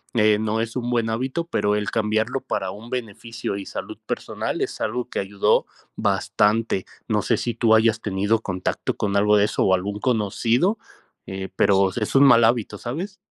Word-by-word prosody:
eh, 105 -1 +4
no 110 0 -1
es 115 +1 -3
un 120 -1 -2
buen 115 -2 0
hábito, 130 +8 -2
pero 105 -9 +1
el 105 -1 -2
cambiarlo 110 +4 0
para 95 -1 -3
un 110 +4 -11
beneficio 115 -3 -5
y 100 - -7
salud - - -7
personal - - -3
es - - -3
algo 120 +3 -2
que - - -4
ayudó 100 0 +1 0.3
bastante, 105 -2 +1 0.2
no 105 -2 +1
sé 110 +1 +1
si 120 0 -2
tú 115 -1 +4
hayas 110 0 +3
tenido 105 +2 0
contacto 95 -3 -3
con 100 -1 -1
algo 105 +1 +4
de 100 - +4
eso - - 0
o 95 - +4
algún 100 +3 -4
conocido, 120 - +1 0.5
eh, 95 0 -5
pero 95 -1 +3
es 110 +2 -3
un 135 - +7
mal 120 -4 +7
hábito, 115 -1 +1
¿sabes? 175 +12 -5
110 Hz, 185 wpm, -23 LUFS, 105-120 Hz, 0.5 s, un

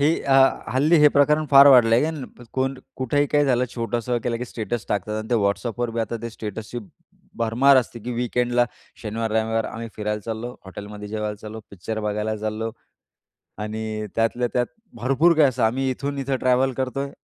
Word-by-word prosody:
ही 150 +3 +3
अ, 135 - +1 0.4
हल्ली 155 +6 +4
हे 150 - +8
प्रकरण 150 +2 +4
फार 140 0 +9
वाढलं 120 -4 +7
आहे 120 - +4
आणि 155 -5 -4
प 125 - -12
कोण 135 +1 0 0.2
कुठेही 145 +3 +1
काही 145 0 +2
झालं 125 -2 +2
छोटंसं 120 +1 -1
केलं 120 -1 0
की 125 - -3
स्टेटस 115 -1 -4
टाकतात 105 +1 -2
आणि 110 - -6
ते - - +3
WhatsAppवर 115 +4 -1
बी 115 - -2
आता 115 +1 -2
ते 115 - -4
स्टेटसची 110 +2 -6 0.6
भरमार 120 +5 +4
असते 120 -2 0
की 120 +3 -5
वीकेंडला 120 0 +1 0.4
शनिवार-रविवार 110 0 -1
आम्ही 115 0 -6
फिरायला 105 0 -2
चाललो, 115 +2 -5
हॉटेलमध्ये 105 +2 -8
जेवायला 105 0 -3
चाललो, 110 +1 -9
पिक्चर 110 +3 -5
बघायला 105 +1 -2
चाललो 110 +1 -3 0.9
आणि 110 0 -4
त्यातल्या 120 +2 +1
त्यात 125 -1 +2 0.3
भरपूर 135 +9 +3
काही 150 -3 +6
असं. 125 - -2
आम्ही 130 +4 +1
इथून 140 +2 -4
इथं 135 0 -1
ट्रॅव्हल 130 +1 +2
करतोय, 135 +2 -3
120 Hz, 180 wpm, -23 LUFS, 110-130 Hz, 0.9 s, फार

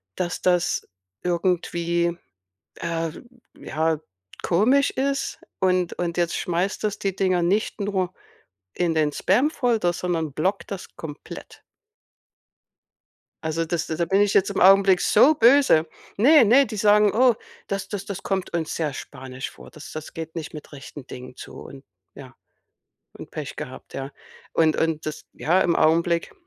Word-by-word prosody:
dass 180 -1 -3
das 180 -2 +1 0.4
irgendwie, 170 -1 0 0.6
äh, 165 -1 -2 0.5
ja, 160 0 -1 0.4
komisch 250 +11 +3
ist, 275 +1 -2 0.2
und 185 -2 +2
und 170 -1 -3
jetzt 170 -1 +1
schmeißt 180 +3 -1
das 210 -1 -1
die 195 -2 -2
Dinger 185 -2 +1
nicht 205 +5 0
nur 195 -3 -1 0.6
in 175 -2 0
den 155 -2 +2
Spam-Folder, 240 - +1
sondern 165 -4 -2
blockt 190 +8 -1
das 195 -2 -7
komplett. 150 -2 -10 1.8
Also, 160 +1 -1
das 170 0 -2
da 160 +1 -1
bin 195 +4 +2
ich 205 -1 +2
jetzt 195 - +3
im 200 - -2
Augenblick 195 0 +6
so 270 +8 +5
böse. 240 - +5 0.3
Ne, 280 +7 +7
ne, 255 +6 +6
die 220 -2 -7
sagen: 210 0 +4
„Oh, 245 0 +4 0.3
das 195 0 -3
das 200 -2 -5
das 200 - -6
kommt 190 -3 -2
uns 165 -2 -2
sehr 155 -4 -2
spanisch 130 -1 -7
vor. - - -14
Das 155 - -11
das 155 0 -7
geht 160 0 -7
nicht 160 -2 -6
mit 150 -1 -10
rechten 135 -1 -10
Dingen 125 0 -9
zu - - -10
und 135 -1 -12 0.3
ja, - - -12 0.8
und - - -11
Pech - - -6
gehabt“, - - -9
ja. 135 +1 -5 0.4
Und 160 -1 +3
und 160 -1 -1
das 155 - -5
ja, 180 +4 +1
im 170 - +2
Augenblick 170 +2 +2
175 Hz, 150 wpm, -24 LUFS, 160-200 Hz, 1.8 s, Ne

